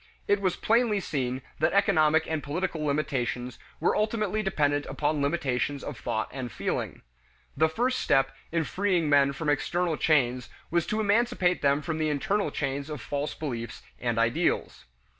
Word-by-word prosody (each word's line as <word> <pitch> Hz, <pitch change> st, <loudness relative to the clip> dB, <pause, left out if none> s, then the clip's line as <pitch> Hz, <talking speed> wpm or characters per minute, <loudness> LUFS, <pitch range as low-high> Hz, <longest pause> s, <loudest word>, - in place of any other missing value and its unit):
It 205 Hz, 0 st, +2 dB
was 185 Hz, -3 st, +1 dB
plainly 225 Hz, -2 st, +2 dB
seen 130 Hz, -7 st, -2 dB, 0.2 s
that -, -, +2 dB
economic 160 Hz, -5 st, +4 dB
and 160 Hz, -2 st, -2 dB
political 160 Hz, +2 st, -2 dB
limitations 135 Hz, -4 st, -1 dB, 0.2 s
were -, -, +2 dB
ultimately 215 Hz, -1 st, 0 dB
dependent 145 Hz, -7 st, 0 dB
upon 150 Hz, 0 st, -1 dB
limitations 140 Hz, -2 st, -1 dB
of -, -, -5 dB
thought 110 Hz, -1 st, -2 dB
and 130 Hz, -3 st, -5 dB
feeling. -, -, -3 dB, 0.5 s
The 160 Hz, 0 st, +3 dB
first 250 Hz, +9 st, 0 dB
step 135 Hz, 0 st, +2 dB, 0.2 s
in 165 Hz, 0 st, +1 dB
freeing 180 Hz, -3 st, 0 dB
men 140 Hz, -1 st, +5 dB
from 150 Hz, +2 st, -5 dB
external 170 Hz, +3 st, 0 dB
chains 125 Hz, -5 st, +2 dB, 0.2 s
was 170 Hz, -1 st, +1 dB
to 215 Hz, -, -1 dB
emancipate 205 Hz, -4 st, +2 dB
them 140 Hz, +1 st, +2 dB
from 160 Hz, -2 st, -3 dB
the 155 Hz, -1 st, +1 dB
internal 195 Hz, +8 st, 0 dB
chains 140 Hz, 0 st, -3 dB
of 150 Hz, -2 st, -5 dB
false 145 Hz, +3 st, -3 dB
beliefs 120 Hz, -6 st, -5 dB, 0.2 s
and 120 Hz, -2 st, -1 dB
ideals. 115 Hz, +1 st, 0 dB
150 Hz, 160 wpm, -27 LUFS, 140-180 Hz, 0.5 s, men